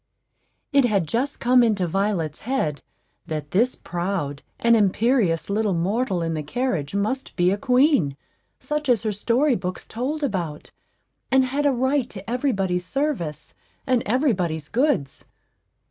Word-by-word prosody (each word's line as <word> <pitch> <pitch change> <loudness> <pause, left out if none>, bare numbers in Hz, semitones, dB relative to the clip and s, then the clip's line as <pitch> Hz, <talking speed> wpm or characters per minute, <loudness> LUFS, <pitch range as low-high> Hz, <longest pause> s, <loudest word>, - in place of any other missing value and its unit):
It 280 -2 +5
had 200 -7 +1
just 245 - -2
come 250 +1 +5
into 210 -6 +2
Violet's 175 -4 -1
head 160 - -2 0.5
that 150 -3 -4
this 235 +7 +2
proud 170 -5 -3 0.2
and 235 0 +4
imperious 205 - +2
little 205 -1 0
mortal 190 +1 0
in 165 0 -1
the 155 - -2
carriage 170 - -2
must 240 +7 -2
be 175 +1 +3
a - - +2
queen, 250 - +3 0.4
such 300 -2 -3
as 235 -3 +3
her 215 - 0
story 240 +8 +2
books 180 -1 -4
told 275 +7 -3
about, 175 - -3 0.6
and 265 0 +4
had 285 +3 0
a - - +4
right 260 0 +1
to 195 -2 -9
every 250 +4 0
body's 185 -4 -1
service 240 - -2 0.3
and 255 -3 +2
every 255 +4 +2
body's 160 -5 -2
goods. 240 - 0
210 Hz, 150 wpm, -23 LUFS, 175-255 Hz, 0.6 s, It